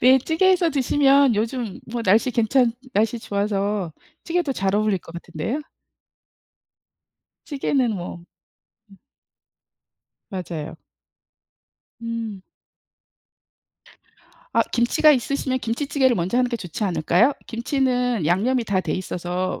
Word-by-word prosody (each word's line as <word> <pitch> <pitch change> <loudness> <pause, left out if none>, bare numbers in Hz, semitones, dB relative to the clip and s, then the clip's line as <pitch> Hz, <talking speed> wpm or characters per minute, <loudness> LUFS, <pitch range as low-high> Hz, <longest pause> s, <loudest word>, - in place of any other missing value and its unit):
네. 260 +2 +7
찌개 320 +8 +1
해서 360 -2 +3
드시면 275 -2 +4
요즘 225 0 -2
뭐 235 0 -3
날씨 220 +5 +3
괜찮 235 +1 +2 0.2
날씨 225 +3 +1
좋아서 200 -3 -1 0.3
찌개도 335 -4 0
잘 195 -4 -1
어울릴 210 -2 +2
것 165 - -14
같은데요. 170 - -4 1.9
찌개는 270 -5 0
뭐 175 -1 -6 0.7
예. 195 - -16 1.3
맞아요. 170 -5 -5 1.2
음. 230 -4 -5 2.1
아 - - +4
김치가 240 +6 +4
있으시면 260 0 -1
김치찌개를 260 +2 +1
먼저 185 +7 0
하는 250 -1 +2
게 235 - -2
좋지 185 +1 -6
않을까요? 185 - +3
김치는 245 - 0
양념이 230 +9 +1
다 200 -3 0
돼 - - -3
있어서 180 0 -3
230 Hz, 235 characters per minute, -23 LUFS, 195-260 Hz, 2.1 s, 네